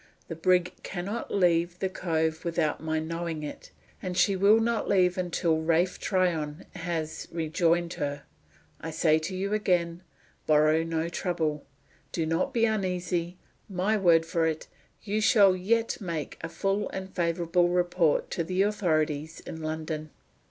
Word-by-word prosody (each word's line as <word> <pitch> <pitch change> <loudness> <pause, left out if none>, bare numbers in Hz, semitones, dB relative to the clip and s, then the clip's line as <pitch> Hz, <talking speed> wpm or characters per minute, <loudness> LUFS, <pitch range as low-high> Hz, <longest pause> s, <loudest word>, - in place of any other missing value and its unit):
"The 165 - -4
brig 180 +1 +2
can 175 -2 -5
not 215 +4 -4
leave 175 -2 +2
the 190 - -1
cove 160 -3 -1
without 160 -4 0
my 160 0 -1
knowing 165 0 -3
it; 150 - -8 0.3
and 180 -1 -4
she 200 - +4
will 200 +4 +5
not 230 -1 0
leave 180 -2 +3
until 170 -3 0
Ralph 170 +3 +1
Tryon 165 -6 0
has 165 -3 -4
rejoined 170 +1 +1
her. 145 -3 -3 0.6
I 160 - -5
say 155 0 +3
to 165 +4 -5
you 200 +2 -2
again 175 -5 +1 0.5
borrow 155 +1 +4
no 165 0 -1
trouble. 165 -4 -2 0.4
Do 165 - -1
not 165 +2 0
be 230 -1 +2
uneasy. 180 -4 -1 0.3
My 195 +3 +1
word 170 -5 +4
for 165 0 +1
it, 160 -1 -3 0.4
you 215 +1 -1
shall 200 -4 +6
yet 225 +6 0
make 165 -6 -4
a 165 - -4
full 195 +5 -1
and 190 0 -6
favorable 175 0 +1
report 175 -3 +1
to 170 - -1
the 185 +4 +1
authorities 160 -6 0
in 160 - -8
London." 155 0 -4
170 Hz, 150 wpm, -28 LUFS, 160-185 Hz, 0.6 s, shall